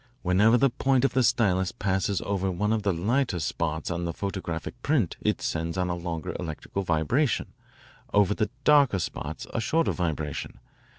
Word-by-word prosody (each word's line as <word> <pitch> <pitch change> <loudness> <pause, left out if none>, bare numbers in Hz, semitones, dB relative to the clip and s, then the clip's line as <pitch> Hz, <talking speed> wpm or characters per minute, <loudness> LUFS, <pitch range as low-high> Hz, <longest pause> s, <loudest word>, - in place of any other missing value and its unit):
Whenever 100 +6 +4
the 135 +1 +3
point 135 0 +2
of - - +1
the 130 - +3
stylus 100 -7 +2
passes 95 0 -1
over 95 -1 -1
one 105 +4 0
of 110 - 0
the 100 -1 +1
lighter 100 +4 0
spots 80 +1 -2
on 85 0 -2
the 85 - -1
photographic 95 -4 -4
print 130 - +1
it - - 0
sends 80 +2 -2
on 90 -1 0
a - - -1
longer 85 -2 -4
electrical 85 +3 -4
vibration, 95 - 0 0.6
over 105 -1 +4
the 110 0 -1
darker 145 -8 +5
spots 85 - -4
a - - 0
shorter 165 +7 +1
vibration. 80 -5 -3
95 Hz, 170 wpm, -27 LUFS, 85-115 Hz, 0.6 s, darker